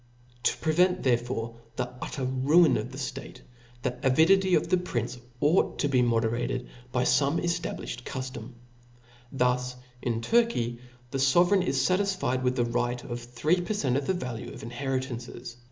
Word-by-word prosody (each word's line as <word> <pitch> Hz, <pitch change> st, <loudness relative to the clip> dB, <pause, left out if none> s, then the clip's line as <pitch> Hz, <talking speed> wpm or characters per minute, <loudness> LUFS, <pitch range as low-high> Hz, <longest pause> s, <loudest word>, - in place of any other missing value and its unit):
To -, -, +1 dB
prevent 180 Hz, +3 st, +2 dB
therefore 120 Hz, -2 st, 0 dB, 0.2 s
the 125 Hz, -, -2 dB
utter 135 Hz, -, -4 dB
ruin 140 Hz, +7 st, +4 dB
of 110 Hz, +4 st, -3 dB
the 130 Hz, -, -8 dB
(tate, 135 Hz, -, -6 dB, 0.4 s
the 125 Hz, -1 st, -2 dB
avidity 175 Hz, +8 st, +4 dB
of -, -, +1 dB
the 185 Hz, -, +3 dB
prince 125 Hz, -8 st, -3 dB, 0.2 s
ought 150 Hz, +6 st, +2 dB
to 145 Hz, -, +1 dB
be 130 Hz, -3 st, +3 dB
moderated 120 Hz, +1 st, 0 dB, 0.2 s
by 125 Hz, 0 st, +1 dB
feme 140 Hz, +4 st, +3 dB
eftabliflied 170 Hz, -8 st, -3 dB
cuftorii. 130 Hz, -2 st, -6 dB
• -, -, -14 dB, 0.8 s
Thus, 125 Hz, -1 st, 0 dB, 0.3 s
in 115 Hz, -2 st, -1 dB
Turky, 170 Hz, -, +1 dB, 0.3 s
the 135 Hz, -, -2 dB
fovcrcign 175 Hz, +8 st, +4 dB
is 135 Hz, -5 st, +1 dB
fatisfied 185 Hz, -8 st, +1 dB
with 125 Hz, 0 st, +1 dB
the 120 Hz, -2 st, +1 dB
right 120 Hz, +1 st, -1 dB
of 120 Hz, -2 st, -5 dB
three 135 Hz, +9 st, 0 dB
per 195 Hz, +5 st, -2 dB
cent, 130 Hz, -10 st, 0 dB
pn 140 Hz, 0 st, -1 dB
the 190 Hz, -, +1 dB
value 125 Hz, -9 st, -5 dB
of -, -, -10 dB
inheritances 125 Hz, -1 st, -4 dB
130 Hz, 160 wpm, -28 LUFS, 120-165 Hz, 0.8 s, ruin